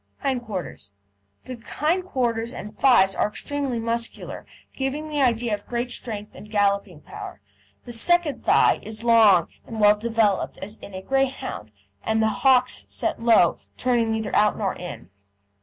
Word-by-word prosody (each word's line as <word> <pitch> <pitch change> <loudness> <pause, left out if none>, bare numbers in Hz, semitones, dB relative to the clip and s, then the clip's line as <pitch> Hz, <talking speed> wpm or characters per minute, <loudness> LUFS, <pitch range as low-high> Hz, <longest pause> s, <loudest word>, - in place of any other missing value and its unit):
HIND 260 -3 -1
QUARTERS 180 - -6 0.5
The 255 -1 -8
hind 340 +8 -1
quarters 235 -7 -1
and 210 -4 -8
thighs 235 -8 +4
are - - +1
extremely 275 +3 -3
muscular, 230 0 -3 0.3
giving 275 +3 -3
the 300 -2 -1
idea 235 -3 +1
of 205 -1 -5
great 240 +1 -2
strength 210 -4 -5
and 210 - -12
galloping 200 -5 0
power. - - -9 0.5
The 240 - -8
second 335 +5 +2
thigh - - +4
is 220 +1 -5
long 220 -7 +5
and 225 - -7
well 210 0 +6
developed 220 -2 0
as 210 +3 -7
in 200 - -11
a 185 - -7
Greyhound, 270 - -2 0.3
and 220 - 0
the 220 0 +3
hocks 255 -2 +3
set - - -2
low, 225 -7 +4 0.2
turning 240 -3 +1
neither 220 -1 -2
out 210 0 +3
nor 200 -3 -1
in. 175 - -9
230 Hz, 155 wpm, -24 LUFS, 210-255 Hz, 0.5 s, well